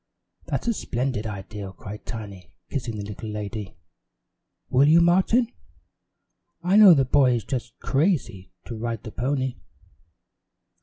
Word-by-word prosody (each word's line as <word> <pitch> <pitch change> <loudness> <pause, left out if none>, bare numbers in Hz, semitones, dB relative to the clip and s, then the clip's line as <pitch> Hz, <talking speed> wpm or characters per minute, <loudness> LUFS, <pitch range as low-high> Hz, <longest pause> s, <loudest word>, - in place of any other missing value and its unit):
"That's - - -3
a 235 - +3
splendid 125 - -2
idea," 100 -1 -7
cried 105 +2 -10
Tiny, 100 -5 -8 0.2
kissing 120 -5 -3
the 105 - -4
little 105 +2 -7
lady. 105 -1 -6 0.9
"Will 135 +3 +4
you, 160 +3 +7
Martin? 190 +8 +3 1.1
I 180 +3 +2
know 205 -5 +9
the 135 -2 +3
boy 130 -1 +4
is 115 - -2
just 130 -3 -5
crazy 135 - 0
to 120 - -6
ride 115 0 -4
the 110 - -8
pony." 130 +1 -2
120 Hz, 135 wpm, -24 LUFS, 105-145 Hz, 1.1 s, know